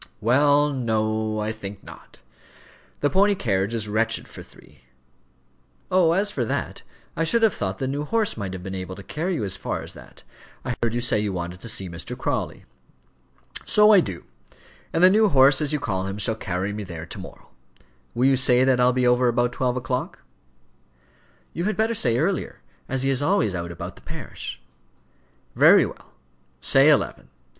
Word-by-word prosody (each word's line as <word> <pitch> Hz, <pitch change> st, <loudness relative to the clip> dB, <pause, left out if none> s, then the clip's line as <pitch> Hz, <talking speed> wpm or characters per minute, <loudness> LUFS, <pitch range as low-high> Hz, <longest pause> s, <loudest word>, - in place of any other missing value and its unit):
"Well, 145 Hz, +6 st, +3 dB
no; 110 Hz, -3 st, -1 dB
I 105 Hz, +1 st, -2 dB
think 105 Hz, -2 st, -8 dB
not. -, -, -14 dB, 0.8 s
The 145 Hz, -, +2 dB
pony 200 Hz, +2 st, +3 dB
carriage 100 Hz, -, -1 dB
is 110 Hz, -2 st, -2 dB
wretched 110 Hz, +2 st, -1 dB
for -, -, -11 dB
three." 65 Hz, -2 st, -19 dB, 1.1 s
"Oh, 180 Hz, -3 st, +4 dB
as 200 Hz, +3 st, +1 dB
for 130 Hz, -, -2 dB
that, 115 Hz, -, -3 dB, 0.3 s
I 165 Hz, -, 0 dB
should 230 Hz, +8 st, +2 dB
have 220 Hz, -5 st, +4 dB
thought 95 Hz, -1 st, -3 dB
the 130 Hz, -, -3 dB
new 140 Hz, +3 st, -3 dB
horse 220 Hz, +5 st, 0 dB
might 100 Hz, -4 st, -5 dB
have 90 Hz, -1 st, -7 dB
been 95 Hz, +1 st, -6 dB
able 95 Hz, 0 st, -5 dB
to 100 Hz, -, -11 dB
carry 170 Hz, -, -3 dB
you 130 Hz, -, -2 dB
as 100 Hz, -1 st, -2 dB
far -, -, -4 dB
as -, -, -7 dB
that. -, -, -15 dB, 0.4 s
I 125 Hz, -, -1 dB
heard 115 Hz, -1 st, 0 dB
you 120 Hz, -, -1 dB
say 120 Hz, -3 st, +2 dB
you 105 Hz, -1 st, -1 dB
wanted 90 Hz, 0 st, -5 dB
to 115 Hz, -, -5 dB
see 105 Hz, -4 st, -1 dB
Mr. 85 Hz, -1 st, -7 dB
Crawley." -, -, -3 dB, 1.0 s
"So 210 Hz, 0 st, +5 dB
I 205 Hz, -, +8 dB
do; 95 Hz, -, -4 dB, 0.7 s
and 165 Hz, -, +1 dB
the 185 Hz, -, +9 dB
new 215 Hz, +1 st, +4 dB
horse, 135 Hz, -1 st, +5 dB
as 150 Hz, -1 st, 0 dB
you 150 Hz, -, 0 dB
call 95 Hz, -6 st, -2 dB
him, 95 Hz, +1 st, -5 dB
shall 105 Hz, +2 st, 0 dB
carry 95 Hz, -2 st, -3 dB
me 105 Hz, 0 st, -5 dB
there 85 Hz, -4 st, -8 dB
to -, -, -8 dB
morrow. -, -, -12 dB, 0.7 s
Will 125 Hz, +2 st, +2 dB
you 135 Hz, 0 st, +4 dB
say 125 Hz, 0 st, +4 dB
that 130 Hz, -1 st, +3 dB
I'll 125 Hz, 0 st, +4 dB
be 125 Hz, 0 st, +1 dB
over 125 Hz, 0 st, +3 dB
about 120 Hz, 0 st, +1 dB
twelve 125 Hz, -1 st, -1 dB
o'clock?" 125 Hz, +1 st, -4 dB, 1.3 s
"You 170 Hz, -, -3 dB
had 215 Hz, -, -1 dB
better 220 Hz, +1 st, +1 dB
say 120 Hz, -, +1 dB
earlier, -, -, -2 dB, 0.3 s
as 135 Hz, 0 st, -1 dB
he 135 Hz, -, +2 dB
is 135 Hz, 0 st, 0 dB
always 155 Hz, -, +1 dB
out 85 Hz, -1 st, -4 dB
about 85 Hz, -, -8 dB
the -, -, -16 dB
parish." 60 Hz, -, -7 dB, 1.0 s
"Very -, -, +6 dB
well, -, -, -11 dB, 0.5 s
say 135 Hz, -, +4 dB
eleven. 140 Hz, -, +1 dB
120 Hz, 190 wpm, -23 LUFS, 100-145 Hz, 1.3 s, the